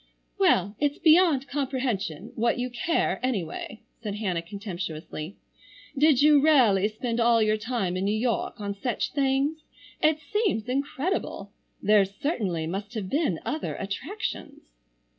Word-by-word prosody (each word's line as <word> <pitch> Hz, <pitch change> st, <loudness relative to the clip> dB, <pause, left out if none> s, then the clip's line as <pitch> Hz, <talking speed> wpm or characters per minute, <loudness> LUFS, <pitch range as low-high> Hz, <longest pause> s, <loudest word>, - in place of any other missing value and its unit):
"Well, 195 Hz, +3 st, +3 dB
it's 290 Hz, 0 st, +1 dB
beyond 315 Hz, -4 st, +4 dB
comprehension 250 Hz, -, -2 dB
what 235 Hz, +1 st, +1 dB
you 250 Hz, 0 st, -2 dB
care, 245 Hz, -, 0 dB
anyway," 220 Hz, -4 st, -3 dB, 0.2 s
said 210 Hz, -3 st, -4 dB
Hannah 190 Hz, -5 st, -1 dB
contemptuously. 175 Hz, -3 st, -6 dB, 0.6 s
"Did 290 Hz, -1 st, +4 dB
you 300 Hz, -1 st, +6 dB
really 240 Hz, -10 st, +5 dB
spend 230 Hz, +2 st, -3 dB
all 235 Hz, 0 st, +4 dB
your 215 Hz, -1 st, +3 dB
time 215 Hz, -5 st, -2 dB
in 185 Hz, +1 st, -1 dB
New 210 Hz, +2 st, +1 dB
York 235 Hz, -1 st, -1 dB
on 200 Hz, -1 st, -3 dB
such 230 Hz, +5 st, -2 dB
things? 280 Hz, +2 st, +1 dB, 0.4 s
It 310 Hz, 0 st, +4 dB
seems 380 Hz, -, -1 dB
incredible. 275 Hz, -, -2 dB, 0.3 s
There 210 Hz, 0 st, +5 dB
certainly 195 Hz, -, -2 dB
must 195 Hz, +7 st, -5 dB
have 200 Hz, -4 st, -3 dB
been 285 Hz, -, +1 dB
other 310 Hz, 0 st, -3 dB
attractions?" 265 Hz, -, -5 dB
230 Hz, 135 wpm, -26 LUFS, 200-280 Hz, 0.6 s, you